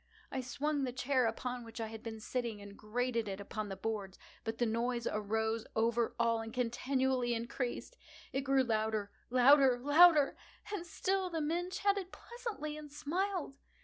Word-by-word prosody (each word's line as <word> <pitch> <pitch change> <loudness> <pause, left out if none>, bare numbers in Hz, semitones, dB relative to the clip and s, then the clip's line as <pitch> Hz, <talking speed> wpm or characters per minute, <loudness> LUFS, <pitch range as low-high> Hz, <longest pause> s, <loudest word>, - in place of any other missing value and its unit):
I 265 - -1
swung 285 +3 -1
the 255 - -1
chair 255 0 +2
upon 245 +2 -3
which 230 0 -9
I 225 - -1
had 220 0 -8
been 225 -1 -6
sitting, 235 -1 -3
and 200 0 -10
grated 230 +1 -1
it 195 0 -4
upon 210 +1 -4
the 195 - -4
boards, 195 -1 -4 0.3
but 225 0 -3
the 240 - +2
noise 235 +1 0
arose 220 +2 -1
over 230 +1 +1
all 230 -1 +2
and 225 0 -6
continually 255 0 0
increased. 240 - -4 0.4
It 270 - +1
grew 270 -1 +3
louder—louder—louder! 255 +7 +5 0.4
And 350 -4 -4
still 375 +2 0
the 330 -2 -2
men 340 +4 -1
chatted 395 0 0
pleasantly, 450 -11 -6
and 300 -1 -9
smiled. 330 0 -2
245 Hz, 155 wpm, -34 LUFS, 225-290 Hz, 0.4 s, louder—louder—louder